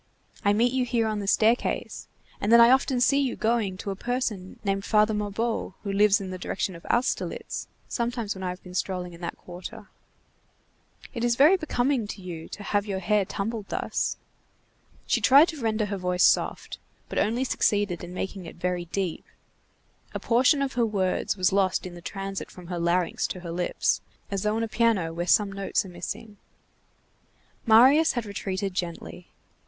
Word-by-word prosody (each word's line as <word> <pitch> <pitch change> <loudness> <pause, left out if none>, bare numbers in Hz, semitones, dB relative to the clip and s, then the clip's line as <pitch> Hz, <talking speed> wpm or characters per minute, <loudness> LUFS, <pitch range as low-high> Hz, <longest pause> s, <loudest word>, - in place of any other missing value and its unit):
I 205 - +4
meet 235 +4 +2
you 260 -1 +1
here 235 -2 0
on 215 -1 -1
the 200 - -4
staircase, 225 +4 +1 0.3
and 205 - 0
then 235 - +8
I 235 +1 +8
often 265 -1 +3
see 275 +3 +4
you 270 -3 0
going 220 -4 0
to 200 - -4
a - - -4
person 220 -4 -3
named 195 -1 -1
Father 215 0 +3
Mabeuf 210 0 -2
who 200 -2 -3
lives 205 0 +4
in 190 -2 -6
the 185 - -6
direction 185 +1 -3
of 170 - -12
Austerlitz, 240 +2 -1 0.2
sometimes 235 -3 -2
when 190 - -8
I 185 - -1
have 180 +1 -7
been 180 - -11
strolling 180 -1 -3
in 170 - -13
that 170 - -5
quarter. 190 +5 -10 1.2
It 235 -3 -4
is 240 -1 +2
very 300 +9 +6
becoming 270 - 0
to 205 - -7
you 165 -3 -7
to 205 - -8
have 205 0 0
your 195 -2 -2
hair 200 +2 +1
tumbled 210 +2 -4
thus." - - -2 0.9
She - - +1
tried 280 +6 +7
to 310 -5 -6
render 220 -1 0
her 200 -1 -3
voice 180 -1 0
soft, - - +2 0.3
but - - -2
only 235 +4 +1
succeeded 205 -8 0
in 175 - -7
making 185 0 -5
it - - -10
very 180 0 -2
deep. 180 -1 -3 0.9
A - - -1
portion 260 +4 +3
of 275 - -3
her 240 - +1
words 200 -2 0
was 185 0 +2
lost 195 -2 +1
in 180 - -7
the 175 - -10
transit 195 +2 -5
from 180 - -12
her 175 -1 -3
larynx 170 +1 +1
to 185 - -6
her 170 -2 -6
lips, 175 +1 0 0.3
as 195 -1 -1
though 210 +1 0
on 225 - 0
a - - -1
piano 215 -7 +1
where 175 +1 -3
some 205 0 +4
notes 195 0 -1
are - - -9
missing. 190 +4 -7 1.3
Marius 265 +8 +6
had 240 -3 -2
retreated 195 -1 -3
gently. 175 0 -5
205 Hz, 190 wpm, -26 LUFS, 185-235 Hz, 1.3 s, then